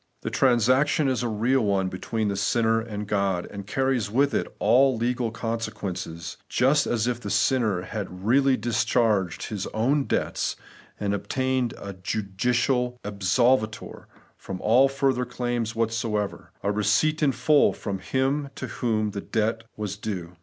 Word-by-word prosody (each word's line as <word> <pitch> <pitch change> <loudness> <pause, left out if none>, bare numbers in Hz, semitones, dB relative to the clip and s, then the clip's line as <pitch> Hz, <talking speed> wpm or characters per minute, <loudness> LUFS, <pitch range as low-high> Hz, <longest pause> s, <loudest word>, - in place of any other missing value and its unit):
The - - -3
transaction 130 +4 +3
is 130 -2 0
a 120 - -1
real 120 +5 +1
one 100 -3 +1
between 105 +4 -2
the 100 - -1
sinner 115 +3 +2
and 105 -2 -5
God, 100 -3 0
and 100 -1 -8
carries 130 -3 0
with 135 +6 +2
it - - 0
all 130 +1 +4
legal 120 0 0
consequences, 110 -7 -4
just 140 +4 +3
as 115 -2 0
if 120 -1 -1
the 105 - -5
sinner 110 -3 +1
had 105 +1 -4
reaUy 125 +8 +2
discharged 110 -4 +1
his 105 -3 -3
own 135 +6 +2
debts - - -1 0.4
and 100 -1 -1
obtained 130 +4 -1
a 100 0 -7
judicial 120 +6 -1
absolvitor 110 +3 0 0.3
from 95 -1 -7
all 125 +5 +5
further 135 -2 +1
claims 120 -2 -2
whatever; 115 -2 -2
a 100 - +1
receipt 105 +10 +2
in 145 -2 +4
full 150 +2 +4
from 100 -2 -5
Him 135 +5 -1
to - - -5
whom 110 -3 -1
the 100 -1 -5
great - - -21
debt 110 +1 0
was 105 -1 -4
due. 90 -5 -5
115 Hz, 155 wpm, -25 LUFS, 105-125 Hz, 0.4 s, all